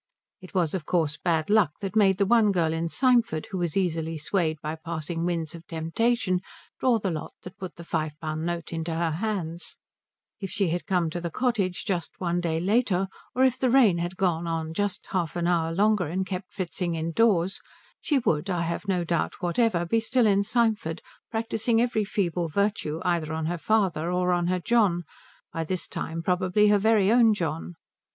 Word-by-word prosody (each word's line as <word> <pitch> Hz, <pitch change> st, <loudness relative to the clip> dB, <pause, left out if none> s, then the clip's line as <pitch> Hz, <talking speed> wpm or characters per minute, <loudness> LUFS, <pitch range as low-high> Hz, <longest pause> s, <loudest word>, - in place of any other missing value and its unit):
It 185 Hz, +1 st, -13 dB
was 170 Hz, -4 st, +1 dB
of 185 Hz, -4 st, -2 dB
course 155 Hz, -3 st, 0 dB
Bad 160 Hz, -3 st, +1 dB
Luck 205 Hz, -9 st, +4 dB
that 195 Hz, +1 st, -4 dB
made 195 Hz, -3 st, +4 dB
the 200 Hz, -, +2 dB
one 220 Hz, 0 st, +4 dB
girl 165 Hz, -4 st, +1 dB
in 165 Hz, +1 st, -2 dB
Symford 235 Hz, -, +2 dB
who 190 Hz, -, -2 dB
was 175 Hz, 0 st, -1 dB
easily 165 Hz, -3 st, -1 dB
swayed 160 Hz, 0 st, -1 dB
by 155 Hz, +1 st, -4 dB
passing 165 Hz, +1 st, -4 dB
winds 165 Hz, -2 st, -2 dB
of 165 Hz, -1 st, -11 dB
temptation 185 Hz, +5 st, 0 dB, 0.4 s
draw 250 Hz, -3 st, +3 dB
the 200 Hz, -4 st, -2 dB
lot 155 Hz, -2 st, -5 dB
that 180 Hz, -, -11 dB
put 185 Hz, -3 st, -7 dB
the 170 Hz, -, -10 dB
five 155 Hz, -2 st, -2 dB
pound 155 Hz, 0 st, -3 dB
note 170 Hz, 0 st, -3 dB
into 165 Hz, 0 st, -3 dB
her 165 Hz, 0 st, 0 dB
hands; 175 Hz, -2 st, -4 dB, 0.6 s
if 195 Hz, -2 st, -5 dB
she 195 Hz, -2 st, 0 dB
had 175 Hz, +5 st, -3 dB
come 180 Hz, -5 st, +1 dB
to 175 Hz, +1 st, -4 dB
the 170 Hz, -, -3 dB
cottage 200 Hz, -3 st, -1 dB
just 180 Hz, -4 st, -3 dB
one 175 Hz, -1 st, 0 dB
day 165 Hz, -2 st, -1 dB
later, 195 Hz, 0 st, +1 dB, 0.3 s
or 255 Hz, -, +3 dB
if 260 Hz, -1 st, +3 dB
the 255 Hz, -, +2 dB
rain 235 Hz, -9 st, +5 dB
had 175 Hz, +2 st, -3 dB
gone 170 Hz, -3 st, 0 dB
on 160 Hz, -1 st, -2 dB
just 205 Hz, +2 st, -2 dB
half 175 Hz, -4 st, -1 dB
an 175 Hz, -1 st, -1 dB
hour 170 Hz, -2 st, +1 dB
longer 205 Hz, 0 st, +2 dB
and 185 Hz, +4 st, -2 dB
kept 185 Hz, 0 st, -5 dB
Fritzing 175 Hz, -1 st, -3 dB
indoors, 170 Hz, +3 st, +1 dB, 0.4 s
she 295 Hz, -, +1 dB
would, 180 Hz, -, 0 dB
I 175 Hz, -2 st, 0 dB
have 170 Hz, +4 st, -3 dB
no 180 Hz, -3 st, +1 dB
doubt 170 Hz, 0 st, -1 dB
whatever, 175 Hz, 0 st, +1 dB
be 225 Hz, +7 st, +2 dB
still 235 Hz, +2 st, +2 dB
in 200 Hz, -2 st, +4 dB
Symford 215 Hz, -6 st, 0 dB, 0.3 s
practising 225 Hz, 0 st, 0 dB
every 230 Hz, -3 st, +1 dB
feeble 180 Hz, -4 st, -1 dB
virtue 165 Hz, -3 st, -1 dB
either 170 Hz, -3 st, 0 dB
on 160 Hz, 0 st, -2 dB
her 170 Hz, +1 st, -2 dB
father 180 Hz, -5 st, +1 dB
or 180 Hz, 0 st, +1 dB
on 175 Hz, -1 st, +1 dB
her 180 Hz, 0 st, +1 dB
John, 185 Hz, -3 st, +2 dB, 0.5 s
by 165 Hz, -, -2 dB
this 180 Hz, +2 st, -2 dB
time 165 Hz, +1 st, -4 dB
probably 185 Hz, +3 st, +2 dB
her 205 Hz, -1 st, +4 dB
very 215 Hz, -1 st, +3 dB
own 230 Hz, -2 st, +5 dB
John. 85 Hz, -, -3 dB
180 Hz, 195 wpm, -26 LUFS, 165-205 Hz, 0.6 s, rain